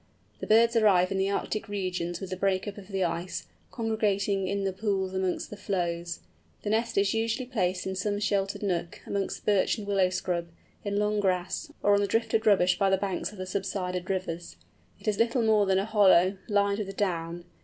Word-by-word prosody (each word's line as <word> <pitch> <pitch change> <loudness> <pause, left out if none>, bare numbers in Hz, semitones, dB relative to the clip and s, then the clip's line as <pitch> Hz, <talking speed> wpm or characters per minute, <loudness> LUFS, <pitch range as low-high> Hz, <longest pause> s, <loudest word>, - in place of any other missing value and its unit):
The - - -5
birds 230 +2 +5
arrive 195 -5 +4
in 195 - 0
the 190 +1 +1
Arctic 215 +2 -2
regions 180 -3 -2
with 190 -1 -7
the - - -1
break 190 +1 0
up 205 0 -6
of 190 - -12
the 195 -2 -1
ice, 175 +1 -3 0.2
congregating 205 -4 0
in 200 +1 -1
the 195 -1 -1
pools 190 -1 -1
amongst 190 -1 -2
the - - -5
floes. 175 -4 -2 0.4
The 205 - -1
nest 225 0 0
is 195 0 +3
usually 225 +3 -1
placed 185 -7 -1
in 190 - -3
some 205 +2 -1
sheltered 200 -1 -1
nook, 175 -3 -2
amongst 200 -1 -3
birch 205 +1 +3
and 210 - -6
willow 195 -2 +2
scrub, 180 -2 -2 0.4
in 205 0 -2
long 210 0 +1
grass, 190 - -1
or 205 - +5
on 200 - +4
the 200 - +1
drifted 225 +1 +1
rubbish 185 -3 +4
by 195 -1 +3
the 190 - +3
banks 195 0 -2
of 210 - -13
the 185 - -4
subsided 185 -1 -3
rivers. 180 -3 -3 0.4
It - - -13
is 210 -2 +1
little 235 +1 +2
more 215 -2 +4
than 190 0 +3
a 195 - +1
hollow, 195 -3 +5
lined 200 0 +2
with 195 -2 -5
down. 170 -3 -2
195 Hz, 205 wpm, -28 LUFS, 185-210 Hz, 0.4 s, birds